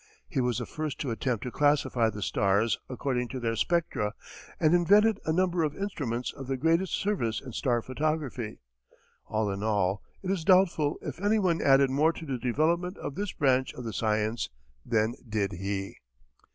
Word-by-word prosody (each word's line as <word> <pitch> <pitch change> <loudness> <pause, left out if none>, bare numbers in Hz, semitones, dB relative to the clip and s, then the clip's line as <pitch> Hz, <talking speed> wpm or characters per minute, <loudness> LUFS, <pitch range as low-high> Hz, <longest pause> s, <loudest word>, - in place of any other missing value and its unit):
He 130 - -1
was 125 -1 0
the 120 - -3
first 155 +2 -4
to 135 - -2
attempt 115 -1 -1
to 125 - -4
classify 145 -5 +2
the 105 -1 -5
stars 100 +4 +2
according 125 -1 -1
to 130 +1 -5
their 115 -2 -1
spectra, 155 -10 0 0.4
and 155 -1 +4
invented 205 +5 +5
a 160 - +1
number 180 0 +2
of 150 -1 -1
instruments 135 - -3
of 135 -2 -9
the 135 0 -1
greatest 165 +6 +2
service 120 - -1
in 130 - -9
star 120 -1 0
photography. 135 -5 -2 0.7
All 110 -2 0
in 100 0 -4
all, 100 -3 +1 0.2
it 190 - -1
is 185 -4 -1
doubtful 170 -5 +4
if - - -6
anyone 200 -5 +2
added 135 -1 +5
more 155 +5 +3
to 165 - -8
the 135 -4 -3
development 165 - 0
of - - -5
this 200 +2 -3
branch 130 -2 +1
of 125 - -7
the 115 -2 -5
science 110 0 0 0.3
than 110 0 +1 0.2
did 105 -2 0
he. 95 +1 -4
130 Hz, 180 wpm, -28 LUFS, 115-165 Hz, 0.7 s, invented